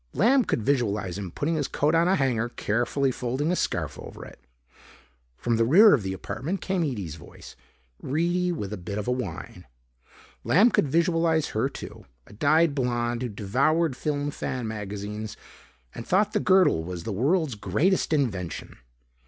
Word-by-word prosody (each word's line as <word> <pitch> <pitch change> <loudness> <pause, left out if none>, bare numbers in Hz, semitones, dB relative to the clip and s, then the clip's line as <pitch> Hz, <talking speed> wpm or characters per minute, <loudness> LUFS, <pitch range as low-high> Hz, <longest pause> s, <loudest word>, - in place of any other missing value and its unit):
Lamb 255 +4 +4
could 115 - -1
visualize 105 -8 0
him 95 -3 -5
putting 145 - -2
his 150 -4 -1
coat 150 +2 0
on 165 +1 +3
a 190 - +4
hanger, 120 - 0
carefully 120 +5 0
folding 130 +6 -2
a - - +1
scarf - - -2
over - - -9
it. - - -14 1.0
From 120 -1 0
the 115 - +3
rear 195 - +7
of 135 - +3
the 95 -1 -3
apartment 120 - -4
came 185 -1 -1
Ede's 100 - -4
voice, - - -13 0.5
reedy 175 +5 0
and 175 - -2
with 100 0 -5
a - - -4
bit 95 +3 -6
of 105 - -4
a - - +1
whine. 125 -10 -5 0.8
Lamb 210 +9 +5
could - - +2
visualize 165 +1 +1
her 110 +5 0
too, - - -10 0.2
a - - -16
dyed 155 +7 +3
blonde 120 -3 -1
who 125 - -2
devoured 135 +10 +1
film 145 +1 -2
fan 125 -4 -4
magazines 105 0 -6 0.6
and 115 - -8
thought 205 +3 +2
the 210 - +2
girdle 185 - +4
was 85 0 -6
the 110 - -4
world's 145 - +1
greatest 110 - 0
invention. 110 - -2
130 Hz, 170 wpm, -26 LUFS, 105-165 Hz, 1.0 s, rear